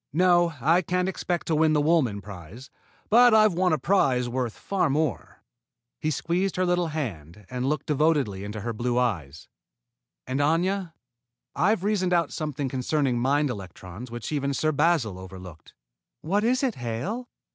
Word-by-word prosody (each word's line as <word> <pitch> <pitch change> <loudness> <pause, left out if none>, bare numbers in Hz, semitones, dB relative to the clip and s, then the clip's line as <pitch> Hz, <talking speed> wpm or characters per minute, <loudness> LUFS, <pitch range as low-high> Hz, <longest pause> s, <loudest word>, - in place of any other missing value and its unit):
No, 175 -1 +3
I 165 +8 +3
can't 180 +1 -1
expect 180 -2 -2
to 165 - -1
win 155 0 +3
the 150 - +3
Woolman 145 -10 +2
prize, 100 +5 -11 0.4
but 240 0 +7
I've 215 -2 +5
won 180 +1 +2
a 155 - +3
prize 130 -6 +2
worth 120 -2 -3
far 195 -6 0
more." 150 -4 -2 0.6
He 155 - -1
squeezed 175 +6 -1
her 185 - +1
little 175 -1 +1
hand 105 - -6
and 125 +1 -1
looked 150 - -2
devotedly 145 -10 +1
into 105 +1 -6
her 115 +2 -3
blue 120 +2 -1
eyes. 80 - -2 0.8
"And, 130 +2 -2
Aña, 170 +4 +1 0.6
I've 205 0 +2
reasoned 195 -3 +1
out 170 -4 +1
something 150 -3 -3
concerning 130 0 0
mind 140 +3 +1
electrons 95 +2 -9
which 120 +4 -6
even 140 -2 -1
Sir 155 +4 +1
Basil 145 - +1
overlooked." 95 -3 -11 0.5
"What 200 +6 0
is 255 +4 +1
it, 260 -4 +1
Hale?" 130 - -4
150 Hz, 160 wpm, -26 LUFS, 120-175 Hz, 0.8 s, but